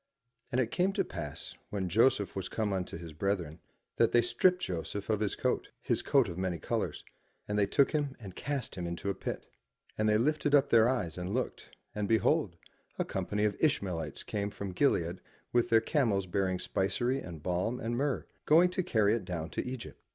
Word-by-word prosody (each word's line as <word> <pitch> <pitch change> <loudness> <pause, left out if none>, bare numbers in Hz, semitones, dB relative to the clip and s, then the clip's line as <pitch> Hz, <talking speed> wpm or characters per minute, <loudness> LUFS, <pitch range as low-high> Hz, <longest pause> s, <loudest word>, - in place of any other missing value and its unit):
And 125 - +1
it 120 -3 +1
came 185 +2 +2
to 195 -2 +1
pass 75 -5 -6 0.2
when 95 -3 -2
Joseph 105 +1 +3
was 95 -2 -3
come 105 -3 -1
unto 90 -3 -3
his 85 -2 -9
brethren, 85 -2 -2 0.4
that 115 - +3
they 120 - +5
stript 180 +11 +3
Joseph 95 +4 -3
of 105 - +1
his 105 -2 0
coat, - - -1
his - - 0
coat - - +3
of 85 - -5
many 95 -2 -1
colours, - - -2 0.4
and 105 - -2
they 105 -1 +3
took 140 -2 +3
him 145 -3 -1
and 95 -5 -9
cast 140 -3 -3
him 90 -2 -4
into 85 +3 -2
a - - -2
pit. - - -5 0.5
And 110 0 +3
they 105 - +4
lifted 145 +4 +2
up 140 0 +4
their 115 0 +6
eyes 90 -10 -1
and 90 +4 -3
looked, 130 - -4 0.2
and, 105 -1 -2
behold, 115 - +2 0.4
a - - 0
company 105 0 -2
of 105 - +1
Ishmaelites 90 - 0
came 100 -1 -2
from 100 -1 -6
Gilead 90 - +1 0.3
with 120 -1 +3
their 115 -1 +5
camels 115 - +1
bearing 95 0 0
spicery 120 +9 0
and 85 - -8
balm 90 +8 -1
and 115 +2 -2
myrrh, 140 +2 0 0.2
going 170 +4 +6
to 185 - 0
carry 110 - +3
it 115 - -1
down 85 -3 -4
to - - -2
Egypt. 125 -1 -7
105 Hz, 200 wpm, -31 LUFS, 90-130 Hz, 0.5 s, their